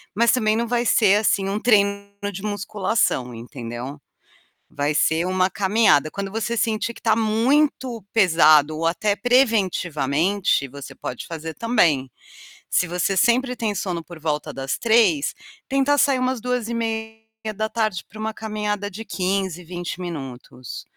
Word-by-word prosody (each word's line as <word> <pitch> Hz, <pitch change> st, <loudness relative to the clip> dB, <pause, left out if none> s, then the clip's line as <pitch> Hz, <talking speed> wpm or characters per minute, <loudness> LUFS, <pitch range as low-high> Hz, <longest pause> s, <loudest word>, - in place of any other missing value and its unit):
mas 235 Hz, +2 st, +4 dB
também 215 Hz, -4 st, +2 dB
não 235 Hz, +1 st, -1 dB
vai 240 Hz, 0 st, 0 dB
ser 205 Hz, -3 st, +5 dB
assim 200 Hz, -2 st, +1 dB
um 200 Hz, +2 st, -1 dB
treino 200 Hz, -3 st, +2 dB, 0.2 s
de 190 Hz, -, -7 dB
musculação, 205 Hz, -, -1 dB
entendeu. 120 Hz, +3 st, -7 dB, 0.7 s
Vai 145 Hz, +1 st, 0 dB
ser 160 Hz, +3 st, +2 dB
uma 185 Hz, 0 st, +2 dB
caminhada. 195 Hz, -6 st, +3 dB
Quando 195 Hz, +4 st, -5 dB
você 225 Hz, +2 st, -2 dB
sentir 225 Hz, +1 st, -1 dB
que -, -, -15 dB
está 225 Hz, -, +3 dB
muito 235 Hz, +1 st, +1 dB
pesado 155 Hz, -6 st, +5 dB
ou 165 Hz, -, -2 dB
até 200 Hz, +5 st, 0 dB
preventivamente, 190 Hz, -, +1 dB
você 140 Hz, +1 st, -10 dB
pode 125 Hz, -, -6 dB
fazer 160 Hz, -1 st, -6 dB
também. 155 Hz, -, +2 dB, 0.6 s
Se 180 Hz, -, +2 dB
você 180 Hz, +3 st, -1 dB
sempre 250 Hz, +5 st, +2 dB
tem 220 Hz, -4 st, -2 dB
sono 175 Hz, -3 st, -3 dB
por 170 Hz, 0 st, -12 dB
volta 150 Hz, -1 st, -2 dB
das 135 Hz, 0 st, -4 dB
15h, 220 Hz, -11 st, +3 dB, 0.3 s
tenta 275 Hz, +1 st, +2 dB
sair 275 Hz, -1 st, +3 dB
umas 255 Hz, -1 st, -1 dB
14h:30 220 Hz, -3 st, -3 dB
para 215 Hz, -, -13 dB
uma 220 Hz, 0 st, -3 dB
caminhada 210 Hz, -2 st, -3 dB
de 215 Hz, +3 st, -8 dB
15, 190 Hz, -3 st, -2 dB
20 175 Hz, +1 st, -6 dB
minutos. 135 Hz, -7 st, -7 dB
200 Hz, 140 wpm, -22 LUFS, 165-225 Hz, 0.7 s, ser